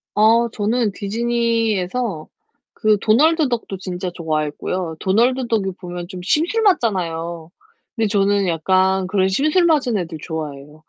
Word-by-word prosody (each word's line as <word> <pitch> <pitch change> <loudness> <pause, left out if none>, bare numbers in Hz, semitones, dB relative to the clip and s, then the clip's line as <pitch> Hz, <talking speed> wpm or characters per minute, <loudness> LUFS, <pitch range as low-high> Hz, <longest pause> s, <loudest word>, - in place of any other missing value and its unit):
어. 230 +3 +4
저는 225 +1 0
디즈니에서 225 -3 -1 0.5
그 215 -1 +2
도널드 300 - +3
덕도 230 -5 -3
진짜 185 0 -5
좋아했고요. 160 +1 -3
도널드 240 +6 +1
덕이 210 -5 0
보면 175 -1 -7
좀 185 -2 -7
심술 335 - +1
맞잖아요. 170 - 0 0.5
그런데 225 -1 +1
저는 200 -1 +2
약간 185 +3 +1
그런 190 0 +1
심술 305 - +2
맞은 280 -9 +2
애들 165 -4 -4
좋아해요. 150 -2 -7
200 Hz, 300 characters per minute, -20 LUFS, 175-235 Hz, 0.5 s, 어